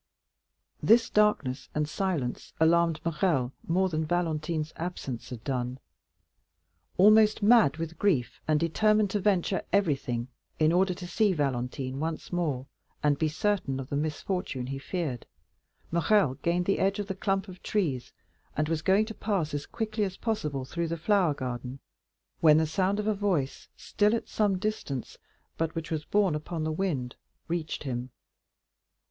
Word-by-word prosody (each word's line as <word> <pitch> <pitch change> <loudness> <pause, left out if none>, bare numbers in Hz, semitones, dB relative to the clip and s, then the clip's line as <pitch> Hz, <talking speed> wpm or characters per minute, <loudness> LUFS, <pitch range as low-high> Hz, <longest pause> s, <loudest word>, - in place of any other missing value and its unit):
This 230 +1 +4
darkness 145 -12 +2
and 150 0 +1
silence 155 -8 -2
alarmed 165 0 +4
Morrel 165 - 0
still 135 -10 +2 0.2
more 190 +2 +3
than 160 -3 -1
Valentine's 155 -1 -1
absence 160 -8 -5
had 120 -3 -8
done. 125 -1 -2 1.2
Almost 215 +2 +6
mad 210 - +6
with 165 0 -5
grief, 145 - +1
and 155 -1 +3
determined 210 +5 +2
to 205 - 0
venture 190 -1 +1
everything 135 -11 +1 0.3
in 155 0 +4
order 185 +1 +2
to 175 - -7
see 205 +2 +2
Valentine 130 -2 -2
once 160 +1 -4
more, 150 -7 -1 0.4
and 145 -1 +2
be 160 - +2
certain 155 -4 0
of 135 - -6
the - - -2
misfortune 150 -2 -2
he 135 +1 -4
feared, 145 -5 -4 0.6
Morrel 170 -2 +3
gained 175 +1 +1
the 195 - +1
edge 195 +1 +2
of 205 - -2
the 195 - -3
clump 195 +1 -1
of 185 -1 -11
trees, 150 - -1 0.5
and 150 +1 +1
was 160 -1 -1
going 195 +5 +3
to 220 - -7
pass 195 -9 -1
as 145 -1 -3
quickly 220 -2 -2
as 190 -2 -3
possible 150 - -2
through 170 +5 -2
the 170 +1 -3
flower 180 -3 +2
garden, 125 0 -5 0.6
when 155 -2 +6
the 160 - +3
sound 190 +6 0
of 210 - -2
a 215 - +2
voice, 190 -10 -1
still 210 +2 +1
at 230 - -4
some 205 -3 +1
distance, 185 - -4 0.4
but 165 0 -1
which 165 0 -4
was 155 -1 -2
borne 200 -5 +2
upon 155 +2 -3
the 155 - -1
wind, 155 -8 -2 0.3
reached 165 -3 -3
him. 125 -2 -3
165 Hz, 160 wpm, -28 LUFS, 145-195 Hz, 1.2 s, Almost